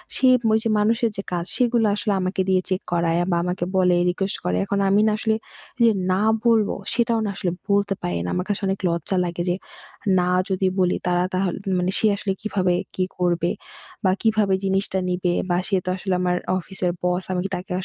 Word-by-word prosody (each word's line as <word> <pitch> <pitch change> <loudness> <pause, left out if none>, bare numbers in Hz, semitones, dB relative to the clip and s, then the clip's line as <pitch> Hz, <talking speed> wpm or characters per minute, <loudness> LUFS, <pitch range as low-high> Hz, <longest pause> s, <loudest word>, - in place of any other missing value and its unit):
সে 260 - +3 0.3
ওইযে 220 +1 +1
মানুষের 225 +2 +2
যে, - - -1
কাজ 175 -1 -2
সেগুলো 240 -2 +2
আসলে 210 0 -1
আমাকে 185 +1 -1
দিয়ে 185 -1 +3
চেক 185 0 0
করায় 170 -1 +1
বা 170 - +2
আমাকে 180 0 -2
বলে, 180 -1 +4
রিকোয়েস্ট 195 +2 -2
করে। 90 0 +1
এখন 200 - -1
আমি 200 +2 +4
না - - +3
আসলে 220 0 +1 0.5
যে, - - +7 0.2
না 185 +2 +2 0.2
বলব 225 -3 +4 0.2
সেটাও 235 -2 +1
না - - -1
আসলে 185 -3 -1 0.2
বলতে 200 0 +2
পারি 90 -1 -2
না। - - -2
আমার 180 - -1
কাছে 205 - -1
অনেক 195 0 -1
লজ্জা 170 +2 -1
লাগে 175 0 -3
যে, 175 - +2 0.6
না 180 0 +1 0.2
যদি 190 0 +1
বলি 180 -1 +2
তারা 175 0 +2
তাহলে 185 -1 0 0.2
মানে 180 +1 0
সে 220 - +3
আসলে 195 - -2
কীভাবে, 190 -4 0 0.2
কী 185 - +1
করবে? 175 -1 +1 0.5
বা 185 - +5
কীভাবে 215 -3 +2
জিনিসটা 195 0 0
নিবে? 180 0 0 0.2
বা 175 - +2
সে 195 - +2
তো - - -2
আসলে 190 0 -2
আমার 180 -1 +1 0.2
অফিসের 180 0 -3
বস 180 +1 0
আমি 185 - 0
কী - - -2
তাকে 180 +2 -7
185 Hz, 200 wpm, -23 LUFS, 180-205 Hz, 0.6 s, যে